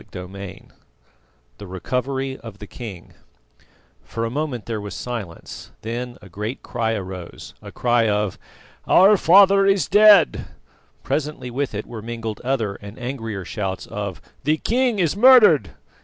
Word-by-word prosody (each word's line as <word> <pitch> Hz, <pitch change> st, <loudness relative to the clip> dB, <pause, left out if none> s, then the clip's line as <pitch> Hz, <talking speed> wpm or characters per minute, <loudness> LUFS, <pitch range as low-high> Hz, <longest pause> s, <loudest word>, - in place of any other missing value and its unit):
CHAPTER 90 Hz, -, -9 dB
VII 100 Hz, 0 st, -9 dB, 1.0 s
THE 100 Hz, -, -9 dB
RECOVERY 130 Hz, +8 st, -3 dB
OF 110 Hz, -4 st, -10 dB
THE 105 Hz, -, -9 dB
KING 105 Hz, -5 st, -10 dB, 0.9 s
For 115 Hz, -, -4 dB
a 115 Hz, -, -3 dB
moment 140 Hz, -4 st, -3 dB
there 110 Hz, -2 st, -4 dB
was 100 Hz, 0 st, -7 dB
silence, 110 Hz, -9 st, -7 dB
then 120 Hz, +2 st, -5 dB
a -, -, -11 dB
great 105 Hz, +7 st, -6 dB
cry 115 Hz, -2 st, -2 dB
arose 95 Hz, -4 st, -7 dB
a -, -, -10 dB
cry 120 Hz, -2 st, +1 dB
of 105 Hz, -2 st, -1 dB, 0.5 s
"Our 195 Hz, +3 st, +6 dB
father 195 Hz, +2 st, +6 dB
is 195 Hz, -1 st, +2 dB
dead!" 210 Hz, -2 st, +6 dB, 0.6 s
Presently 150 Hz, -4 st, -3 dB
with 135 Hz, -2 st, -3 dB
it 105 Hz, -, -4 dB
were 115 Hz, -3 st, -8 dB
mingled 115 Hz, -1 st, -6 dB
other 115 Hz, -6 st, -1 dB
and 100 Hz, +1 st, -10 dB
angrier 115 Hz, -6 st, -5 dB
shouts 95 Hz, -1 st, -4 dB
of 100 Hz, -3 st, -5 dB, 0.2 s
"The 155 Hz, +4 st, +2 dB
king 245 Hz, +4 st, 0 dB
is 175 Hz, -3 st, +1 dB
murdered!" 210 Hz, -, +6 dB
120 Hz, 145 wpm, -22 LUFS, 105-145 Hz, 1.0 s, Our